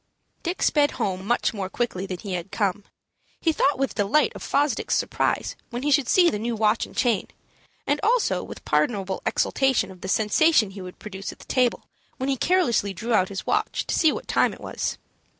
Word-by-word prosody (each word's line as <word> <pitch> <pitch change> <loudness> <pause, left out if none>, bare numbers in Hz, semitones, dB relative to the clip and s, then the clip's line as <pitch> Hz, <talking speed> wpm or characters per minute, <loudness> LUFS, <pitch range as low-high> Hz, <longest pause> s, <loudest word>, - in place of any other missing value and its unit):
Dick 350 +2 -3
sped 290 -1 +4
home 195 -5 -2
much 240 0 +1
more 195 -3 -4
quickly 195 -4 -2
than 185 -2 -4
he 195 +1 -6
had 180 +1 -4
come. 200 -1 -1 0.5
He 330 - +2
thought 285 -2 +2
with 270 0 -1
delight 210 +9 +2
of - - -9
Fosdick's 285 -4 0
surprise - - 0
when 245 +1 -5
he 295 - +1
should 270 -3 +3
see 355 -2 +5
the 210 - -3
new 230 +2 -2
watch 215 +1 +1
and - - -16
chain, 235 -6 +1 0.6
and 290 +1 +1
also 430 - +2
with - - -10
pardonable 190 +6 0
exultation 265 -8 +1
of 185 -1 -14
the - - -5
sensation 220 +3 +3
he 195 0 -9
would 180 0 -9
produce 195 -1 -7
at - - -14
the - - -15
table 250 -2 +1 0.3
when 260 +1 -2
he 275 - +2
carelessly 245 - +1
drew 230 +6 -2
out 185 -4 +3
his 195 -1 -5
watch - - 0
to - - -2
see 320 -3 +4
what - - -6
time - - +2
it - - -17
was. - - -3
220 Hz, 205 wpm, -24 LUFS, 195-275 Hz, 0.6 s, see